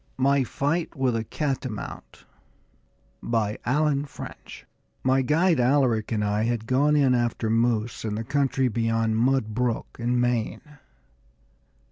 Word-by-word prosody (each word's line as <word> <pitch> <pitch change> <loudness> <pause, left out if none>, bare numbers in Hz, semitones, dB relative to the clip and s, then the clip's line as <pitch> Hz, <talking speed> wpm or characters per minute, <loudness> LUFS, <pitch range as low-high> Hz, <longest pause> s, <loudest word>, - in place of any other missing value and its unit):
MY 140 +1 +3
FIGHT 155 +8 -2
WITH 130 -3 +1
A 115 - -1
CATAMOUNT 130 -4 -5 1.0
By 110 -3 -1
Allen 145 +2 +1
French 140 - -10 0.4
My 130 +1 +3
guide, 160 +4 +2
Alaric, 125 -4 +2
and 105 -2 0
I 105 +2 0
had 115 -1 -1
gone 140 +5 +2
in 135 -3 +4
after 120 -2 0
moose 115 0 0
to 110 - -3
the 105 +2 -3
country 135 +1 +1
beyond 115 -1 0
Mud 120 -2 +1
Brook, 120 0 -2
in 120 +1 0
Maine. 125 +5 -2
125 Hz, 130 wpm, -25 LUFS, 115-140 Hz, 1.0 s, in